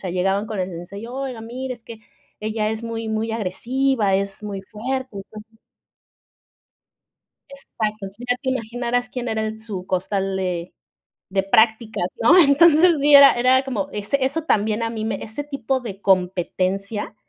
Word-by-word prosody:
sea 185 Hz, -, -3 dB
llegaban 195 Hz, +3 st, 0 dB
con 215 Hz, -3 st, -4 dB
el 180 Hz, -, -2 dB
sensei, 175 Hz, +3 st, -8 dB
y: -, -, -6 dB
"Oiga 255 Hz, -1 st, -5 dB
mire 255 Hz, +3 st, -5 dB
es 235 Hz, -2 st, -12 dB
que 225 Hz, -1 st, -10 dB, 0.4 s
ella 215 Hz, 0 st, -1 dB
es 220 Hz, +1 st, -4 dB
muy 225 Hz, -1 st, -4 dB
muy 220 Hz, +1 st, -2 dB
agresiva, 230 Hz, +2 st, 0 dB
es 195 Hz, +1 st, -2 dB
muy 200 Hz, -2 st, -5 dB
fuerte". 255 Hz, +3 st, -5 dB
Entonces 215 Hz, +3 st, -11 dB, 1.9 s
Exacto, 275 Hz, -5 st, -8 dB, 0.2 s
entonces 205 Hz, +5 st, -10 dB
ya 245 Hz, -, +3 dB
te 260 Hz, -, -1 dB
imaginaras 245 Hz, 0 st, -2 dB
quién 250 Hz, -1 st, -5 dB
era 220 Hz, -1 st, -1 dB
el 220 Hz, 0 st, -4 dB
su 195 Hz, -5 st, -6 dB
costal 190 Hz, +1 st, -1 dB
de 180 Hz, -2 st, -3 dB, 0.5 s
de 195 Hz, 0 st, 0 dB
prácticas, 220 Hz, 0 st, +2 dB, 0.2 s
¿no? 315 Hz, +11 st, +6 dB
Entonces, 320 Hz, +2 st, +6 dB
sí, 290 Hz, 0 st, +6 dB
era 280 Hz, 0 st, +9 dB
era 255 Hz, +2 st, +3 dB
como 210 Hz, -8 st, -3 dB
ese 215 Hz, +7 st, -1 dB
eso 285 Hz, +5 st, -1 dB
también 215 Hz, -5 st, +1 dB
a 230 Hz, -, -1 dB
mí 220 Hz, -1 st, -4 dB
me 220 Hz, -3 st, -3 dB
ese 225 Hz, +6 st, -6 dB
tipo 275 Hz, -2 st, -2 dB
de 205 Hz, -6 st, -7 dB
competencia 190 Hz, +2 st, 0 dB
220 Hz, 165 wpm, -22 LUFS, 195-255 Hz, 1.9 s, era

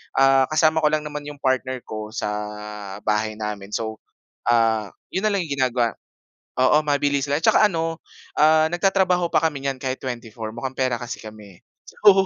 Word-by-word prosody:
ah, 135 Hz, -1 st, +5 dB
kasama 155 Hz, +1 st, +3 dB
ko -, -, +6 dB
lang 155 Hz, -1 st, 0 dB
naman 150 Hz, -1 st, -6 dB
yung 145 Hz, -1 st, -8 dB
partner 130 Hz, -1 st, 0 dB
ko 110 Hz, -1 st, -6 dB
sa -, -, -2 dB, 0.8 s
bahay 110 Hz, 0 st, 0 dB
namin 105 Hz, -2 st, -5 dB
so, 110 Hz, -1 st, -3 dB, 0.5 s
ah, 115 Hz, -2 st, +3 dB, 0.2 s
'yon 190 Hz, -, -2 dB
na -, -, +1 dB
lang 190 Hz, -, 0 dB
yung 140 Hz, -4 st, -4 dB
ginagawa 125 Hz, -3 st, +2 dB, 0.7 s
oo, 130 Hz, +4 st, +5 dB
mabilisan 145 Hz, -1 st, +1 dB
lang -, -, -4 dB
'tsaka 215 Hz, -, +6 dB
ano, 165 Hz, -2 st, -2 dB, 0.4 s
ah, 155 Hz, +1 st, +6 dB
nagtatrabaho 185 Hz, -1 st, +2 dB
pa -, -, +3 dB
kami 150 Hz, -4 st, 0 dB
nyan 135 Hz, -1 st, -1 dB
kahit 130 Hz, -1 st, -3 dB
24 115 Hz, -3 st, -5 dB
mukhang 130 Hz, +2 st, -4 dB
pera 130 Hz, -2 st, +1 dB
kasi 120 Hz, -1 st, -6 dB
kami, 105 Hz, -4 st, -12 dB, 0.5 s
oo 195 Hz, -1 st, +8 dB
135 Hz, 170 wpm, -23 LUFS, 115-155 Hz, 0.8 s, oo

